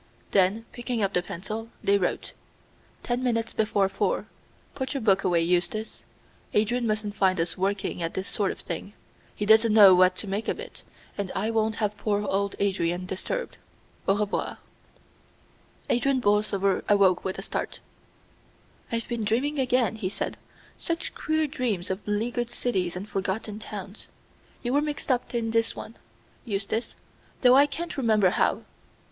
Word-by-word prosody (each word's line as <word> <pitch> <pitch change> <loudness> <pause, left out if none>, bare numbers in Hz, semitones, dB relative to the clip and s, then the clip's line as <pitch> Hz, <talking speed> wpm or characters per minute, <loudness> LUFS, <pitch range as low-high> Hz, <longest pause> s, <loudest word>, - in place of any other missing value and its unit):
Then, 200 +4 +3
picking 240 -2 -2
up 195 0 0
the 180 - +2
pencil, 215 +6 -6
they 200 - +4
wrote: 180 - -2 0.7
"Ten 245 +1 -1
minutes 230 -3 0
before 205 -2 +2
four. 195 - -1 0.5
Put 265 +1 -4
your 275 - -1
book 195 -3 +3
away, 175 -2 +3
Eustace. 180 +6 -1 0.5
Adrian 235 +3 +2
mustn't 215 -1 -1
find 190 -3 +2
us 165 0 0
working 195 -1 -1
at 165 0 -2
this 190 +1 -3
sort 200 -2 0
of - - -4
thing. 180 +4 -5 0.4
He 205 - -2
doesn't 220 +1 +6
know 205 -3 +9
what 185 0 +5
to - - -5
make 200 +3 -2
of - - -1
it, - - -9 0.4
and 200 -2 -2
I 215 +4 0
won't 220 -1 +1
have 210 -2 -1
poor 205 -1 0
old 200 +1 0
Adrian 180 -3 0
disturbed. 475 - -4 0.5
Au 195 - +4
revoir." 210 -1 -1 1.3
Adrian 265 +2 +2
Borlsover 205 -3 +2
awoke 195 -3 +4
with 190 - -3
a 195 - -4
start. - - -3 1.1
"I've 230 -1 -2
been 235 -2 -2
dreaming 265 +8 0
again," 250 -3 +2
he 195 -4 -2
said; - - -3 0.4
"such 335 0 -2
queer 315 0 0
dreams 225 - -2
of 190 - -2
leaguered 235 +3 -1
cities 190 -8 -1
and 190 +3 -5
forgotten 205 +2 -3
towns. 205 -1 -8 0.6
You 245 0 -1
were 290 - +4
mixed 295 -2 -2
up 250 -1 -1
in 225 -1 0
this 230 0 +1
one, 230 - -8 0.5
Eustace, 215 +1 -2 0.5
though 250 -1 +7
I 280 +2 +7
can't 320 +4 -5
remember 215 -7 +3
how. - - +1
210 Hz, 160 wpm, -26 LUFS, 195-240 Hz, 1.3 s, know